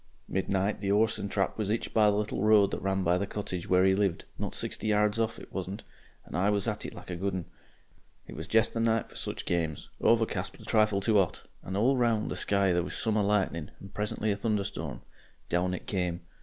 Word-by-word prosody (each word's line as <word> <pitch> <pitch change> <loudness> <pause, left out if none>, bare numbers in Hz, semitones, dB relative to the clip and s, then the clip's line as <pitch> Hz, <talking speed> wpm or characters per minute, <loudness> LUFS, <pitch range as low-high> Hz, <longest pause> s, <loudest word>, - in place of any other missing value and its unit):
"Midnight 95 +2 0
the 100 - -1
'orse 110 +2 +3
and 100 - -3
trap 95 +2 -1
was 105 -2 -1
'itched 110 +2 -1
by 105 -2 +5
the 100 - +2
little 105 -1 -1
road 105 -1 +5
that - - -3
ran 95 0 0
by 90 +1 +3
the 100 - -1
cottage 95 -4 -4
where 90 0 +5
'e 95 - +5
lived 95 -3 0
not - - -3
sixty 110 - -4
yards 105 +1 +2
off, 115 0 0
it - - -12
wasn't 95 +2 -4 0.4
and - - -8
I 95 +3 +2
was 105 +1 +1
at 105 -1 -2
it - - -9
like - - -9
a - - -2
good 95 +2 -2
'un. 90 -3 -3 0.8
It - - -10
was 80 +3 -6
jest 110 +2 +3
the 115 - -2
night 115 0 +1
for - - -16
such - - -4
games 80 -3 -2
overcast - - +2
but - - -15
a - - -12
trifle 110 -2 +3
too 105 0 +4
'ot, 90 -4 0 0.2
and 95 +1 -4
all 130 +6 +3
round 115 -3 +1
the - - -2
sky 100 -2 +2
there 90 - +2
was 90 +1 -4
summer 110 -2 +1
lightning 100 -6 0
and 100 - -12
presently 105 +1 -1
a - - +1
thunderstorm. 105 -2 -2 0.5
Down 90 +1 +1
it - - -8
came. 90 -3 -1
100 Hz, 235 wpm, -29 LUFS, 95-105 Hz, 0.8 s, by